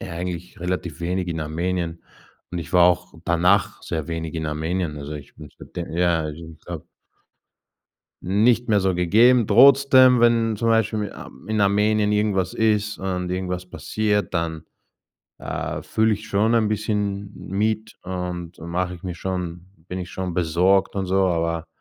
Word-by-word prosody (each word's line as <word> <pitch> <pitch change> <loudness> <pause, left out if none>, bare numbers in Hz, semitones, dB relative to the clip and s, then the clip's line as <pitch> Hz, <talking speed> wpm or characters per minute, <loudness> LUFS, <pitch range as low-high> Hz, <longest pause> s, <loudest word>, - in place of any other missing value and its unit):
Ja, - - -7
eigentlich 90 0 -5
relativ 90 -3 -3
wenig 90 +1 -2
in 80 -1 -3
Armenien, 85 +2 -3 0.5
und 90 - -4
ich 80 -5 -7
war 90 -1 +6
auch 90 0 +1
danach 90 +4 +2
sehr 80 -3 -4
wenig 80 0 -4
in 80 -1 -3
Armenien. 80 +1 -2
Also, 70 +1 -7
ich 75 -2 -10
bin 75 0 -11
seitdem 85 -2 -7
ja, 85 -2 +2
also, 80 +1 -6
ich - - -36
glaube - - -7 1.4
Nicht 115 +6 +2
mehr 105 -2 +3
so 95 -1 +1
gegeben. 110 +7 +4
Trotzdem, 130 +2 +6
wenn 115 -2 +3
zum 115 +2 0
Beispiel 110 -1 +2
in 100 - -7
Ar - - -10 0.2
in 110 -1 -1
Armenien 105 +1 +2
irgendwas 100 -3 0
ist 105 -1 +1
und 90 -1 -3
irgendwas 90 0 -3
passiert, 105 +1 -1
dann, 85 -2 -2 0.7
äh, - - -4
fühle 110 0 +1
ich 105 +2 -9
schon 110 +3 +2
ein 110 -2 +3
bisschen 105 -2 -2
mit 110 +3 -2
und 90 -2 -5
mache 90 +2 -3
ich 85 - -13
mir 90 -2 -4
schon 90 -1 -4 0.2
bin 90 - -4
ich 90 0 -7
schon 95 -2 -4
besorgt 90 +4 +2
und 95 -1 -1
so, 95 +1 +2
aber 85 -2 -1
90 Hz, 165 wpm, -23 LUFS, 85-105 Hz, 1.4 s, war